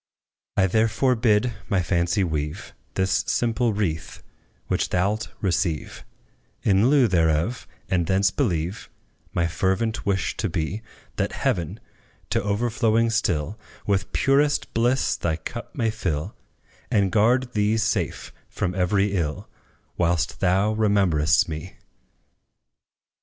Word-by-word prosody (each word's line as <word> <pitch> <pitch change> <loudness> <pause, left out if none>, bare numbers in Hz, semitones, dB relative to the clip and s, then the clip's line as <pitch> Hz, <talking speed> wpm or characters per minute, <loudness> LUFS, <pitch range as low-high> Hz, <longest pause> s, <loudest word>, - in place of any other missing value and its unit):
I 95 - +5
therefore 115 +6 +2
bid 115 0 +2 0.2
my 95 -4 +2
fancy 85 +2 +1
weave 75 -3 -3 0.2
This 95 0 +1
simple 120 0 +1
wreath, 90 -7 -3 0.4
which - - -1
thou 90 +3 +2
'lt 110 +1 -4
receive 90 -4 -1 0.6
In 100 +3 +4
lieu 140 -4 +5
thereof; 85 +4 +1 0.2
and 85 -3 0
thence 95 +1 +3
believe 90 - -2 0.4
My 85 - +1
fervent 95 +6 0
wish 100 -2 0
to 105 - -1
be 85 +5 -2 0.4
That - - -1
Heaven, 85 -3 -1 0.5
to - - +2
overflowing 115 +2 +1
still, 100 -4 -1 0.3
With 100 -1 0
purest 145 +2 +2
bliss 120 +3 +2
thy 80 -2 -1
cup 120 +9 -8
may 115 -4 +1
fill, 80 -8 -3 0.5
And 100 -3 +2
guard 120 +5 +2
thee 105 +1 +2
safe 110 -1 -1 0.2
from 90 - -2
every 95 +2 +1
ill, 80 -5 -2 0.5
Whilst 85 -4 0
thou 95 +3 +2
rememberest 100 -7 +3
me! 80 +3 -6
100 Hz, 120 wpm, -24 LUFS, 85-115 Hz, 0.6 s, I